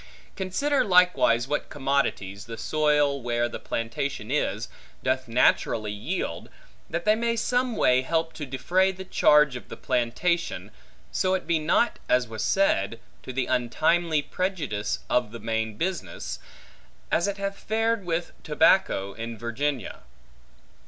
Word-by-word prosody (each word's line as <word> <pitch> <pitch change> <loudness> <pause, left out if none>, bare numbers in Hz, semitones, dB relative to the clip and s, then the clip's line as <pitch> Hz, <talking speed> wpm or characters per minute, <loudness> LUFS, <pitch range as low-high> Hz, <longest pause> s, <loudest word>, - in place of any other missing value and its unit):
Consider 265 +10 +1
likewise 180 - +4
what 145 +1 -2
commodities, 135 -8 -1
the 115 0 -7
soil 150 -2 +2
where 120 0 0
the 120 - -7
plantation 115 0 -3
is, 110 -7 0 0.4
doth 130 0 0
naturally 115 -2 +2
yield, 105 - -4 0.4
that 170 +1 -3
they 215 - +6
may 230 +1 0
some 245 +1 0
way 125 -7 +4
help 165 +4 -1
to 150 - -6
defray 180 +9 +1
the 190 0 -9
charge 150 -6 +4
of 125 - -9
the - - -8
plantation 130 +8 -1 0.4
(so 185 0 +1
it 185 - -3
be 170 -2 +1
not, 165 +10 +2
as 125 -1 +3
was 110 -1 -5
said, 115 - +1 0.2
to - - -7
the 130 0 -1
untimely 155 +6 +1
prejudice 150 - -2
of 125 -4 +1
the 115 - -8
main 110 -1 -2
business), 170 - -4 0.7
as 170 +4 +2
it 200 0 -2
hath 200 0 -4
fared 225 -1 0
with 170 -1 -2
tobacco 150 - +3
in 115 0 -6
Virginia. 120 +2 -3
145 Hz, 140 wpm, -26 LUFS, 115-180 Hz, 0.7 s, they